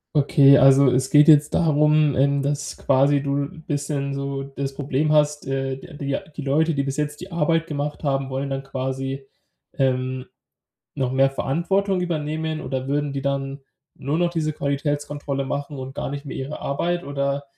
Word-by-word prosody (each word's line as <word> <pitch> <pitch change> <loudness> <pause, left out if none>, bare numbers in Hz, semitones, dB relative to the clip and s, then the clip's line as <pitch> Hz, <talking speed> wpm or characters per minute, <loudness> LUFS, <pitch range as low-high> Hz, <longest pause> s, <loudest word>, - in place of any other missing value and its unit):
Okay, 140 -1 +6
also 135 -1 +6
es 130 +1 +1
geht 150 +1 +6
jetzt 150 -1 +6
darum, 150 -2 +3
ähm, 140 +1 +2
dass 145 0 -3
quasi 140 +1 +3
du 140 0 -1 0.2
bisschen 140 -1 -2
so 140 0 -3
das 135 0 -5
Problem 145 +2 0
hast, 150 -2 +2
äh, 135 0 -2
die 145 +2 -12
die 140 - -6
ja 140 - -1
die 155 -1 -10
Leute, 155 +3 +1
die 140 - 0
bis 135 +1 -3
jetzt 150 0 -2
die 185 +1 -9
Arbeit 165 0 +1
gemacht 150 -1 -4
haben, 135 -1 0
wollen 135 +1 -3
dann 135 0 -2
quasi, 135 0 -4 0.5
ähm, 130 -1 -1 0.7
noch 130 -1 -1
mehr 135 +1 +4
Verantwortung 180 +8 0
übernehmen 155 -2 -2
oder 130 0 -4
würden 145 0 -1
die 135 - -3
dann 140 0 -3 0.3
nur 140 +3 -2
noch 175 0 +1
diese 155 -3 -2
Qualitätskontrolle 145 -1 -2
machen 140 +1 -4
und 130 +1 -7
gar - - -3
nicht 145 +1 -6
mehr 140 - -6
ihre 135 +3 -5
Arbeit 175 +5 -1
oder, 140 0 -2
140 Hz, 175 wpm, -23 LUFS, 135-150 Hz, 0.7 s, Okay